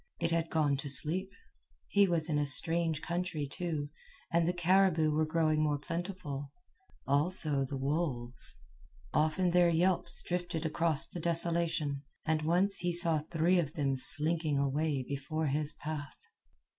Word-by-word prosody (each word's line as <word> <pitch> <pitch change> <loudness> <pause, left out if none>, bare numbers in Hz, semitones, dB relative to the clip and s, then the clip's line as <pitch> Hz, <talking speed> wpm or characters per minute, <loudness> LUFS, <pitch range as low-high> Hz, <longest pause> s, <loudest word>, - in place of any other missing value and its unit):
It 165 - -1
had 165 -1 0
gone 150 -3 +1
to 140 +1 -5
sleep. 155 +8 +2 0.6
He 200 -1 +4
was 170 -3 0
in 150 -3 0
a 145 - +1
strange 165 +2 +1
country, 170 -3 -2
too, 150 -1 -4 0.4
and 170 0 +2
the - - +3
caribou 175 -2 +3
were 155 +1 +1
growing 155 -1 +1
more 150 -1 +1
plentiful, 160 -3 -5 0.6
also 145 -1 +2
the 135 +1 -5
wolves. 130 - -3 0.6
Often 155 +4 +2
their 175 0 +4
yelps 175 +1 +2
drifted 175 -2 -3
across 160 -1 +2
the 175 - -8
desolation, 165 -3 0 0.2
and 155 0 +1
once 180 +5 +2
he 175 0 -1
saw 170 -2 +3
three 165 +4 +1
of 155 -3 -2
them 140 -3 0
slinking 155 +2 +2
away 140 0 0
before 140 +3 -3
his 150 +1 +1
path. 145 -3 -6
160 Hz, 145 wpm, -32 LUFS, 145-170 Hz, 0.6 s, He